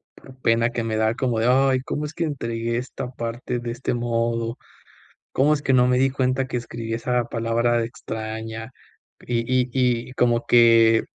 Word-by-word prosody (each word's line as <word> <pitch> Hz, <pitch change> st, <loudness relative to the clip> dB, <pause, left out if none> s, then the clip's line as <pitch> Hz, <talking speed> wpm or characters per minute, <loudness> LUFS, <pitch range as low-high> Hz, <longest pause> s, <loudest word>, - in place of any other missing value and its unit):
por 130 Hz, 0 st, -15 dB
pena 115 Hz, +1 st, +3 dB
que 120 Hz, -1 st, -3 dB
me 110 Hz, -1 st, -2 dB
da 110 Hz, +1 st, +2 dB
como 120 Hz, -4 st, 0 dB
de: 115 Hz, -, +1 dB
"Ay, 130 Hz, 0 st, +4 dB
¿cómo 150 Hz, +3 st, -3 dB
es 150 Hz, -, -7 dB
que 170 Hz, -, -2 dB
entregué 115 Hz, -5 st, -2 dB
esta 125 Hz, 0 st, -5 dB
parte 120 Hz, +1 st, -4 dB
de 120 Hz, 0 st, -4 dB
este 125 Hz, +1 st, -3 dB
modo?, 115 Hz, 0 st, -1 dB, 0.7 s
¿cómo 145 Hz, +3 st, +3 dB
es 145 Hz, -, -1 dB
que 135 Hz, -, +1 dB
no 125 Hz, -1 st, +5 dB
me 125 Hz, -, +3 dB
di 135 Hz, +1 st, +3 dB
cuenta 130 Hz, 0 st, 0 dB
que 130 Hz, -, -5 dB
escribí 115 Hz, -1 st, -5 dB
esa 120 Hz, +1 st, 0 dB
palabra 120 Hz, +1 st, 0 dB
de 115 Hz, -, 0 dB
extraña?". 110 Hz, +1 st, -6 dB, 0.5 s
Y 120 Hz, -1 st, -2 dB
y 125 Hz, 0 st, +1 dB
y, 125 Hz, -2 st, +1 dB
como 120 Hz, -2 st, +1 dB
que, 115 Hz, -1 st, +5 dB
120 Hz, 190 wpm, -23 LUFS, 115-130 Hz, 0.7 s, no